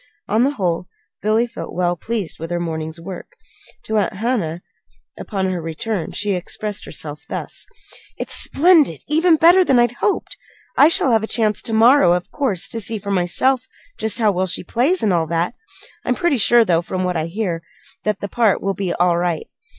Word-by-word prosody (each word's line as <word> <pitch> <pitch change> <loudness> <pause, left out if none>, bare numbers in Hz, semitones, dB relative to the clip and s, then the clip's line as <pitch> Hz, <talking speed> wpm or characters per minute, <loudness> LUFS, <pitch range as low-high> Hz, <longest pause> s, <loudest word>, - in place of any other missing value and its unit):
On 225 +2 +2
the 270 - +3
whole, 180 -4 -1 0.3
Billy 215 +3 +2
felt 235 0 -8
well 175 0 +1
pleased 210 -1 -4
with 165 +1 -6
her 175 0 -2
morning's 160 -1 -4
work. 185 - -9 0.5
To 220 0 0
Aunt 205 - -1
Hannah, 190 -6 -2 0.6
upon 195 -3 -3
her 180 -2 -3
return, 165 +3 -4
she 205 -1 -2
expressed 200 +3 -4
herself 150 -1 -6
thus: - - -6 0.5
"It's - - -5
splendid 305 - +4
even 320 +3 +4
better 345 +4 +6
than 270 -7 +3
I 240 0 +5
hoped. 410 - -1 0.4
I 290 - +7
shall 275 -5 +3
have 225 -2 +3
a 220 - -3
chance 215 -3 +1
to 230 - -3
morrow, 225 -4 +5
of 180 0 -3
course, 255 - -1
to 225 - -3
see 220 +2 -1
for 200 0 -5
myself 195 +8 +1 0.3
just 220 +1 0
how 220 -3 +3
well 185 0 -1
she 180 - -1
plays, 260 - 0
and 205 -4 +2
all 165 -2 +1
that. 170 +6 -1 0.5
I'm - - 0
pretty 345 -6 +1
sure, 235 +1 +5
though, 170 -4 +2
from 185 +1 -3
what 180 -1 -1
I 160 0 -1
hear, 175 -2 -3 0.4
that 210 0 -1
that 200 - -5
part 225 -5 +2
will 195 0 -1
be 190 -2 -3
all 175 -1 +2
right. 175 -2 -1
200 Hz, 195 wpm, -20 LUFS, 175-235 Hz, 0.6 s, I